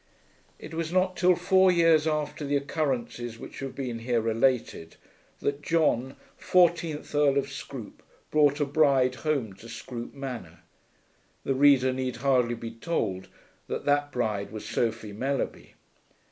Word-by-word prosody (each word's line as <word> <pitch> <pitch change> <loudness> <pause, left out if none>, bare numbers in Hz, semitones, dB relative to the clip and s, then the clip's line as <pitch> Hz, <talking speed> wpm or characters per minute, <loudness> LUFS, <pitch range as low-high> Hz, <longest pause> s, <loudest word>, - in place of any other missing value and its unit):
It 155 - -10
was 165 0 -3
not 185 0 +2
till 180 +1 +4
four 185 +1 +4
years 165 -3 +4
after 150 -1 -2
the 145 0 0
occurrences 130 -5 -2
which - - -10
have 135 -1 -6
been 125 -4 -4
here 120 0 0
related 115 -6 0 0.5
that 140 0 -1
John 145 -5 +1 0.2
fourteenth 170 -4 +2
Earl 145 -1 +3
of 140 0 -1
Scroope 135 -5 -8 0.3
brought 145 -1 +4
a 145 - +2
bride 140 -3 +3
home 140 -10 -1
to 115 - -12
Scroope 120 +2 -7
Manor. 125 - -7 0.8
The 135 - 0
reader 135 -1 +5
need 130 -1 -3
hardly 125 -2 +2
be 115 0 -7
told 115 - -3 0.4
that - - -4
that 145 0 +2
bride 110 -6 -2
was 110 -1 -7
Sophie 110 -3 -2
Mellerby. 135 +6 -3
135 Hz, 145 wpm, -27 LUFS, 120-150 Hz, 0.8 s, reader